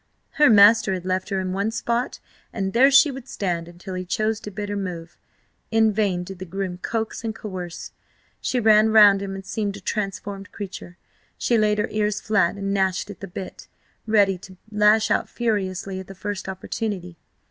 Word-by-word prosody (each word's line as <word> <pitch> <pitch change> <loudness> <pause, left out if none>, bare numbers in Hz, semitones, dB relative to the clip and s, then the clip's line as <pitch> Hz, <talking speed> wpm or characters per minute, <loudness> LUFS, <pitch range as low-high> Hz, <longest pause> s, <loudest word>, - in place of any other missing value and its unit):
Her 295 - +7
master 205 -2 +6
had 180 -1 -7
left 185 +1 -1
her 195 -2 -1
in 185 -1 -3
one 200 +3 0
spot, 235 +2 -2 0.3
and 195 -2 -3
there 260 +4 +6
she 275 +1 +6
would 265 -1 -9
stand 175 -7 -3
until 175 +2 -9
he 185 0 -3
chose 215 +4 -1
to 210 - -8
bid 205 +1 -5
her 205 - -3
move. 175 -4 -5 0.5
In 220 -1 +3
vain 195 -4 0
did 190 0 -9
the 185 - -6
groom 185 0 -4
coax 225 +2 -3
and 220 -1 -3
coerce. 185 -6 -7 0.5
She 255 - 0
ran 215 -1 +5
round 205 -3 +7
him 195 -1 -4
and 195 0 -8
seemed 200 0 -3
a - - -10
transformed 200 0 -4
creature. 190 -3 -8 0.4
She 240 - +1
laid 210 -1 +3
her 210 - 0
ears 210 -1 0
flat 200 -5 +1
and 195 0 -3
gnashed 190 +1 0
at 205 - -12
the 195 - -7
bit, 185 +1 -8 0.4
ready 200 -4 +3
to 190 -1 -13
lash 210 +1 +4
out - - +1
furiously 195 -4 -2
at 190 - -9
the 195 - -10
first 200 0 -5
opportunity. 190 -2 -5
200 Hz, 190 wpm, -23 LUFS, 185-215 Hz, 0.5 s, Her